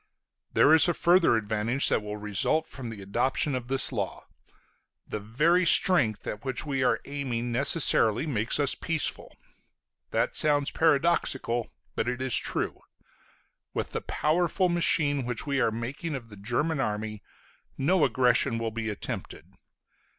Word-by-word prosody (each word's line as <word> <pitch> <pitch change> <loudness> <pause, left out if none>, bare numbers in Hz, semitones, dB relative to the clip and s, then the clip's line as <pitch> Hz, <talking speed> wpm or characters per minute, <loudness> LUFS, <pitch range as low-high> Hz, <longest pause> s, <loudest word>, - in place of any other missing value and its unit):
There 155 - +5
is 160 - +6
a 175 - +1
further 175 -6 +3
advantage 110 +5 +1
that - - +1
will 105 0 -6
result 105 +9 0
from 130 -4 -8
the 105 -3 -9
adoption 125 +8 0
of 125 -2 -4
this 135 +1 +2
law: - - -4 0.8
the 105 - -4
very 150 - +1
strength 145 - +3
at 105 - -6
which 130 +1 -3
we 135 -3 -1
are - - +2
aiming 125 -4 -4
necessarily 130 -2 +3
makes 120 -3 -2
us 140 -2 +2
peaceful. 165 -2 -3 0.7
That - - -1
sounds 145 -1 +1
paradoxical, 140 -6 +1 0.2
but 110 - -2
it 125 0 -4
is 130 -2 0
true. - - -2 0.9
With - - -3
the - - -3
powerful 175 +4 0
machine 150 -5 +1
which 120 +1 -4
we 140 -2 -1
are - - +2
making 130 +8 -5
of 120 -4 -8
the 105 - -11
German 125 +10 -2
army 110 -3 -3 0.6
no 165 +5 +2
aggression 125 -1 +2
will 115 -1 -3
be 110 0 -4
attempted. 105 - -6
130 Hz, 150 wpm, -27 LUFS, 115-150 Hz, 0.9 s, is